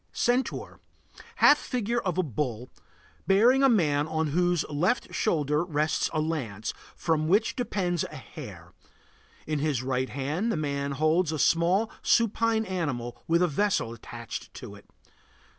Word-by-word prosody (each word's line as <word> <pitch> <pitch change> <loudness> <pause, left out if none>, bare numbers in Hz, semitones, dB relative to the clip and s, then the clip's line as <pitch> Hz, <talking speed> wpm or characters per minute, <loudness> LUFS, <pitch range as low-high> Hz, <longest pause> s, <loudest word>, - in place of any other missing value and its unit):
CENTAUR. 245 +2 -1 0.6
Half 295 - +6
figure 240 -1 -1
of 185 -3 -2
a 185 - +2
bull, 125 -4 -4 0.6
bearing 235 +8 +5
a 270 - +6
man 150 - +2
on 160 -1 -1
whose 175 +1 +1
left 175 +11 0
shoulder 150 -5 +1
rests 155 -2 0
a 155 - -1
lance, 130 -10 -3 0.2
from 155 -2 0
which 205 +6 +2
depends 185 -9 -1
a - - -9
hare. 135 - -10 0.7
In 155 -1 -1
his 140 -4 0
right 130 0 -1
hand 150 - -2
the 185 - -1
man 140 -2 -2
holds 155 +4 +2
a 155 - -2
small, 170 +8 +2
supine 230 0 +2
animal 145 - -3
with 170 +2 +3
a - - +4
vessel 175 - 0
attached 115 -1 -8
to - - -9
it. - - -16
160 Hz, 145 wpm, -27 LUFS, 145-195 Hz, 0.7 s, Half